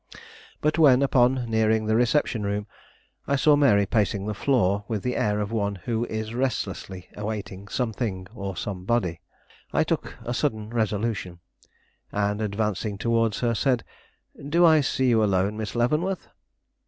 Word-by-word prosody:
But 155 Hz, +2 st, +1 dB
when, 140 Hz, -4 st, +6 dB
upon 125 Hz, -2 st, +3 dB
nearing 110 Hz, -1 st, +2 dB
the 110 Hz, 0 st, +1 dB
reception 120 Hz, 0 st, +2 dB
room, 100 Hz, 0 st, -2 dB, 0.6 s
I 140 Hz, -, +2 dB
saw 145 Hz, +2 st, +5 dB
Mary 105 Hz, -9 st, +4 dB
pacing 100 Hz, -1 st, 0 dB
the 105 Hz, -, -2 dB
floor 100 Hz, -3 st, +1 dB
with 110 Hz, -4 st, -3 dB
the 125 Hz, -, -1 dB
air 105 Hz, 0 st, +1 dB
of 105 Hz, +1 st, -3 dB
one 100 Hz, -3 st, -1 dB
who 115 Hz, +5 st, -2 dB
is 110 Hz, 0 st, -4 dB
restlessly 115 Hz, -7 st, -3 dB
awaiting 105 Hz, -2 st, -5 dB
something 110 Hz, -4 st, -2 dB
or 100 Hz, -4 st, -5 dB
somebody, 95 Hz, -3 st, -2 dB, 0.5 s
I -, -, +2 dB
took -, -, -3 dB
a 120 Hz, -, -2 dB
sudden 110 Hz, -5 st, -2 dB
resolution, 110 Hz, -5 st, -2 dB, 0.7 s
and, 105 Hz, +1 st, -1 dB
advancing 105 Hz, 0 st, -2 dB
towards 115 Hz, -1 st, +1 dB
her, 120 Hz, -1 st, +1 dB
said: 125 Hz, 0 st, +1 dB, 0.7 s
"Do 170 Hz, +3 st, +5 dB
I 160 Hz, -2 st, +6 dB
see 130 Hz, -1 st, 0 dB
you 110 Hz, -2 st, +4 dB
alone, 100 Hz, 0 st, +1 dB
Miss 110 Hz, 0 st, -5 dB
Leavenworth?" 150 Hz, +11 st, 0 dB
110 Hz, 150 wpm, -25 LUFS, 100-125 Hz, 0.7 s, when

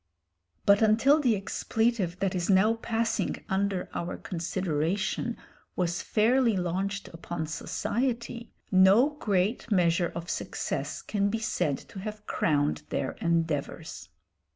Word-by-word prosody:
But 200 Hz, +1 st, +5 dB
until 230 Hz, +8 st, +5 dB
the 250 Hz, -7 st, +3 dB
expletive 210 Hz, -1 st, -1 dB
that 195 Hz, -2 st, +1 dB
is 180 Hz, 0 st, -2 dB
now 200 Hz, +3 st, +5 dB
passing 230 Hz, 0 st, -1 dB
under 195 Hz, -1 st, 0 dB
our 170 Hz, +1 st, -3 dB
consideration 185 Hz, +5 st, -2 dB, 0.4 s
was 175 Hz, -1 st, -1 dB
fairly 230 Hz, 0 st, +3 dB
launched 190 Hz, +3 st, -2 dB
upon 165 Hz, -1 st, -5 dB
society, 235 Hz, -, -3 dB, 0.2 s
no 195 Hz, +9 st, +6 dB
great 210 Hz, -5 st, 0 dB
measure 175 Hz, -2 st, +3 dB
of 170 Hz, 0 st, -5 dB
success -, -, -3 dB
can 200 Hz, -1 st, 0 dB
be 225 Hz, -, -1 dB
said 175 Hz, -10 st, 0 dB
to 195 Hz, -, -8 dB
have 210 Hz, +1 st, -7 dB
crowned 145 Hz, -2 st, +1 dB
their -, -, -1 dB
endeavours. 160 Hz, -, -2 dB
195 Hz, 120 wpm, -28 LUFS, 170-225 Hz, 0.4 s, no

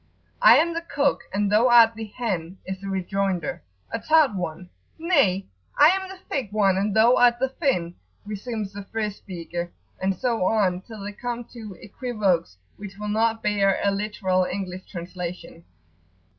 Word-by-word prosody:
"I 225 Hz, +3 st, +8 dB
am 335 Hz, +3 st, +2 dB
the 335 Hz, -, -2 dB
cock 285 Hz, -4 st, 0 dB
and 200 Hz, +1 st, 0 dB
thou 220 Hz, +4 st, +5 dB
art 230 Hz, -1 st, +7 dB
the 225 Hz, 0 st, -6 dB
hen!" 195 Hz, -6 st, -4 dB
is 190 Hz, 0 st, -5 dB
the 200 Hz, -, -7 dB
rejoinder, 190 Hz, -2 st, -2 dB, 0.3 s
a -, -, -2 dB
tart 310 Hz, -6 st, +4 dB
one. 180 Hz, -1 st, -5 dB, 0.3 s
"Nay, 280 Hz, -, +2 dB, 0.3 s
I 295 Hz, +2 st, +8 dB
am 380 Hz, +1 st, 0 dB
the 385 Hz, -, -9 dB
thick 250 Hz, -8 st, -3 dB
one 200 Hz, -3 st, +3 dB
and 200 Hz, +1 st, 0 dB
thou 230 Hz, +3 st, +5 dB
art 240 Hz, -1 st, +5 dB
the 265 Hz, +2 st, 0 dB
thin!" 255 Hz, -, -1 dB, 0.3 s
resumes 210 Hz, 0 st, -5 dB
the 205 Hz, -, -6 dB
first 210 Hz, -1 st, -3 dB
speaker, 175 Hz, -2 st, -6 dB, 0.3 s
and 190 Hz, 0 st, +1 dB
so 230 Hz, 0 st, -1 dB
on 185 Hz, -2 st, +1 dB
till 215 Hz, +1 st, -11 dB
they 205 Hz, -, -5 dB
come 240 Hz, +2 st, -4 dB
to 215 Hz, -6 st, -9 dB
equivoques 205 Hz, -, -1 dB, 0.2 s
which 195 Hz, -1 st, -9 dB
will 210 Hz, 0 st, -5 dB
not 225 Hz, +1 st, +1 dB
bear 200 Hz, -2 st, +2 dB
a 200 Hz, -, +3 dB
literal 195 Hz, -2 st, 0 dB
English 185 Hz, -1 st, -5 dB
translation. 175 Hz, -1 st, -7 dB
205 Hz, 170 wpm, -24 LUFS, 190-235 Hz, 0.3 s, I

